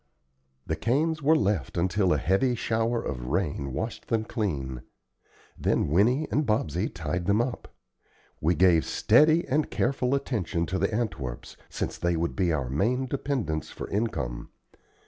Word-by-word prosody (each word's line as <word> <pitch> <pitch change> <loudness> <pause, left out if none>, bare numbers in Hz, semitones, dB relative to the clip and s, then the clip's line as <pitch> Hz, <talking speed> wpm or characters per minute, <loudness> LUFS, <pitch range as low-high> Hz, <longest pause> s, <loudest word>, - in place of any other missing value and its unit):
The 80 - -1
canes 150 - 0
were 155 +3 +4
left 100 - 0
until 90 +2 +2
a 75 - +3
heavy 95 - +2
shower 115 +1 0
of - - -4
rain 75 -3 -1
washed 110 - -4
them 115 -2 +1
clean; 70 - -3 0.7
then - - 0
Winnie 120 - +3
and 150 - +2
Bobsey 105 - 0
tied 85 +1 -3
them 100 +2 +3
up. 120 +1 -2 0.7
We 85 +3 +2
gave 85 -1 +5
steady 155 +9 +4
and 150 +3 +1
careful 130 +1 0
attention 100 -11 -1
to 95 +2 -2
the - - +2
Antwerps, 80 - -4
since - - -4
they 85 0 +1
would 85 +1 -1
be 90 -3 +1
our 70 -5 -1
main 120 - +1
dependence 130 - -2
for - - -7
income. 80 - -2
100 Hz, 150 wpm, -27 LUFS, 80-120 Hz, 0.7 s, gave